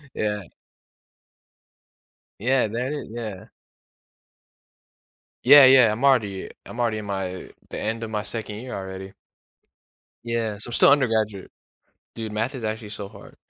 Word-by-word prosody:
Yeah. 105 -1 -1 2.0
Yeah, 125 +1 +2
that 125 +6 -3
i 150 - -4
yeah. 110 -5 -6 2.0
Yeah, 140 +1 +10
yeah, 130 -4 +7
I'm 120 +6 -4
already 105 -8 +2 0.2
I'm 120 - -7
already 115 -2 0
in 105 - -7
my 95 -2 -4 0.2
the - - -5
end 115 +2 -2
of 110 - -5
my 105 -1 -2
2nd 105 -1 -5
year 125 +3 -7
already. 95 0 -7 1.1
Yeah, 115 -3 -2
so 105 - -4
I'm - - -7
still - - +6
undergraduate. 110 -8 +1 0.6
Dude, 110 -2 -6
math 115 +6 -2
is 125 - -6
actually 110 0 -4
so 100 -2 -6
hard. 100 -1 -15
110 Hz, 140 wpm, -24 LUFS, 105-120 Hz, 2.0 s, Yeah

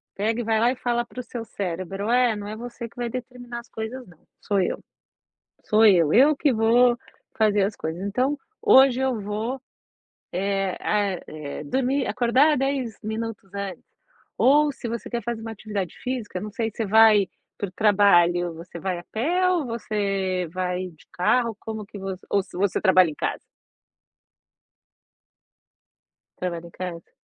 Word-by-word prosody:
pega 220 +4 0
e - - -3
vai 220 -1 +1
lá 240 +2 +4
e - - -3
fala 240 -1 0
para 250 - -10
o - - -4
seu 235 0 -6
cérebro: 195 +1 -4
"É, 245 -2 +3
não 205 0 -6
é 215 - -5
você 235 +1 -7
que - - -22
vai 240 -1 -3
determinar 245 -1 -7
as 235 - -14
coisas 230 +4 -6
não, 170 -2 -18 0.2
sou 200 -2 +1
eu. - - -1 0.8
Sou 220 +1 +4
eu, 170 -7 +5
eu 280 +6 +6
que 280 -2 +2
vou 240 +2 +4 0.4
fazer 210 -2 +3
as 200 +2 -1
coisas 160 +3 -5
então 250 +9 0 0.3
hoje 265 - +6
eu 260 -4 0
vou, 220 +6 -3 0.7
eh 195 0 -1
a 205 -2 +1 0.2
eh, 150 -1 -6
dormir 265 - 0
acordar 260 +5 +3
10 270 -5 -1
minutos 220 -2 -5
antes." 200 -2 -5 0.5
Ou 295 +3 +5
se 255 -3 -7
você 235 0 -5
quer 235 -1 -3
fazer 235 -1 -3
uma 225 0 -6
atividade 205 -5 -4
física, 235 -8 -4
não 210 +1 -6
sei, 225 +2 -2
você 220 +1 -3
vai 215 -1 +6 0.3
para 200 - -3
o - - -20
trabalho, 175 -4 +4
você 170 +2 -10
vai 180 -1 -2
a - - -11
pé 350 +11 +1
ou 345 -5 +1
você 195 -5 -1
vai 180 0 -2
de 160 -3 -20
carro, 230 +5 +2
como 220 -2 -6
que 205 - -10
você 190 -1 -6
ou 200 - +3
se 185 - -11
você 200 0 +1
trabalha 185 -4 +5
em 150 - -8
casa? - - -2 3.0
Você - - -33
trabalha 170 -2 -4
em - - -13
casa? 175 -2 -7
215 Hz, 175 wpm, -24 LUFS, 190-240 Hz, 3.0 s, eu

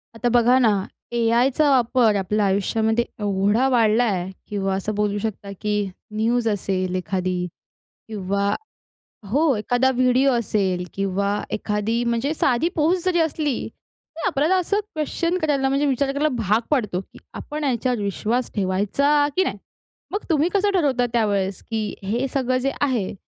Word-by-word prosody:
आता 240 +1 0
बघा 245 +1 +4
ना, 240 -3 +4 0.4
ए-आयचा 240 +5 +2
वापर 245 -4 +3
आपल्या 205 +2 0
आयुष्यामध्ये 220 +4 +1 0.2
एवढा 205 +4 +2
वाढला 230 -2 +3
आहे 190 -5 -1 0.2
किंवा 195 -2 -1
असं 205 +2 -3
बोलू 205 0 0
शकता 205 -1 -4
की 210 -1 -1 0.4
न्यूज 230 +2 +1
असेल 185 -2 -1
एखादी 185 -1 -2 0.6
किंवा 200 -1 -1 0.8
हो, 285 +4 +3
एखादा 245 +5 +1
व्हिडिओ 255 +2 +3
असेल 195 -6 0
किंवा 200 +1 -1
एखादी 215 +3 -1
म्हणजे 235 +5 0
साधी 275 +1 +1
पोस्ट 340 +3 +1
जरी 360 -2 +2
असली, 310 -4 0 0.6
तरी 330 - -4
आपल्याला 320 +1 +2
असं 385 +3 0
क्वेश्चन 335 +3 -1
करायला, 280 -3 +1
म्हणजे 275 +2 +1
विचार 275 0 +1
करायला 290 +2 +1
भाग 215 0 +2
पडतो 210 -10 0
की - - -17
आपण 300 +1 -6
याच्यावर 250 -3 0
विश्वास 215 +5 -1
ठेवायचा 210 +10 +2
की 375 - +3
नाही? - - -3 0.5
मग 405 - -3
तुम्ही 320 +1 +2
कसं 405 0 +2
ठरवता 275 -9 +2
त्यावेळेस, 200 -4 0
की 220 -2 -3
हे 235 +7 -1
सगळं 255 -2 +1
जे 270 +2 0
आहे, 250 -9 0
235 Hz, 145 wpm, -22 LUFS, 205-275 Hz, 0.8 s, बघा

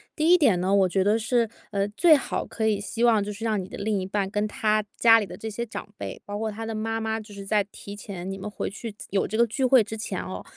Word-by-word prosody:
第 310 0 +1
一 - - +9
点 260 - +4
呢， 185 +2 +1
我 195 -2 +4
觉 190 +1 +2
得 210 +3 +3
是， 230 +1 +1 0.2
呃， 200 0 0
最 310 - +6
好 280 - -2
可 220 - -3
以 210 -2 +1
希 230 +3 -3
望 225 -4 +5
就 205 - -4
是 215 +3 -6
让 215 -4 0
你 185 - -10
的 - - -8
另 205 -1 -1
一 - - -3
半 195 0 -1
跟 205 +2 -1
他 215 0 +1
家 225 -1 +7
里 210 - -3
的 - - -9
这 220 - -6
些 220 +2 -3
长 225 - -7
辈， - - -6
包 205 0 -5
括 220 0 -1
他 225 +2 -6
的 225 - -4
妈 225 +1 -2
妈， 220 0 -2
就 210 -1 -11
是 200 0 -8
在 210 0 +2
提 200 0 -10
前 195 -3 -7
你 - - -4
们 200 +2 -5
回 210 - -4
去 220 +1 -7 0.2
有 195 0 +1
这 220 - -3
个 235 - +5
聚 235 +4 -3
会 255 -2 +6
之 215 +2 -6
前 220 - -4
哦， 95 0 -6
215 Hz, 310 characters per minute, -26 LUFS, 200-225 Hz, 0.2 s, 一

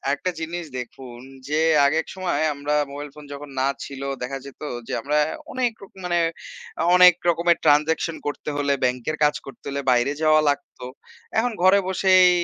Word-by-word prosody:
একটা 180 +6 -3
জিনিস 170 +1 -4
দেখুন, 125 0 -9 0.3
যে 155 +1 +1 0.3
আগে 145 +3 +2
এক - - -17
সময় 180 -5 -1
আমরা 145 +1 -2 0.2
মোবাইল 145 +1 -7
ফোন 150 - -11
যখন 140 0 -9
না 135 - +2 0.2
ছিল 140 -1 -9 0.2
দেখা 135 +2 -4
যেত 140 - -13 0.3
যে - - -5
আমরা 150 +4 0 0.4
অনেক 250 -2 +1
রকম 195 0 -15
মানে 175 -1 +1 0.8
অনেক 180 -1 +8 0.2
রকমের 170 0 +3
ট্রান্সেকশন 155 +2 +3
করতে 145 - -4
হলে 140 -1 +1
ব্যাংকের 125 +5 -1
কাজ 150 - +3
করতে 135 - -12
হলে 140 0 -3
বাইরে 120 +3 +2
যাওয়া 155 0 +5
লাগতো। 140 -3 -4 0.5
এখন 245 +2 0
ঘরে 190 +2 +6
বসেই 185 -1 +5
150 Hz, 170 wpm, -23 LUFS, 140-175 Hz, 0.8 s, অনেক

